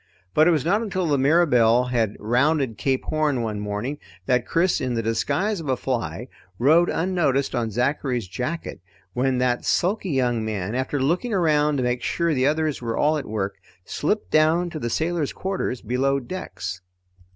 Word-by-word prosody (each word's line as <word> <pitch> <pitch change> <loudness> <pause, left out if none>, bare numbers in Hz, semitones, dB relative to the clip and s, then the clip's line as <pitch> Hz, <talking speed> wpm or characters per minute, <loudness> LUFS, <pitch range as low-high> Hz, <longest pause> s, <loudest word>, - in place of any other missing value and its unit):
But 155 +2 +5
it - - +6
was 155 -4 +1
not 200 +6 +2
until 190 -5 -2
the 145 -4 +1
Mirabelle 125 -6 +4
had 110 -4 +1
rounded 130 +2 +1
Cape 135 -1 0
Horn 150 -5 0
one 105 -2 -3
morning 105 +8 -4 0.3
that 125 +2 +1
Chris, 170 +2 +1
in 125 -2 -1
the 115 - -1
disguise 185 - 0
of 155 -4 -6
a 130 - +1
fly, 120 -1 -3 0.3
rode 160 +8 +4
unnoticed 160 -6 0
on 120 -3 -1
Zachary's 125 -1 -1
jacket 125 - -5 0.3
when 130 +1 +1
that 125 -1 +1
sulky 195 +2 0
young 125 -5 +1
man, 105 -2 -3
after 130 +3 -1
looking 175 - 0
around 150 -4 +2
to 130 - 0
make 125 0 0
sure 170 -1 0
the 130 -1 +2
others 155 -2 0
were 115 -1 -3
all 150 +2 +3
at 140 - -8
work, 100 -2 -3 0.3
slipped 210 +8 -2
down 160 +3 +3
to 155 - -5
the 120 - -3
sailor's 160 +2 -1
quarters 190 -10 -3
below 135 +4 +1
decks. 95 - -6
135 Hz, 175 wpm, -23 LUFS, 120-160 Hz, 0.3 s, it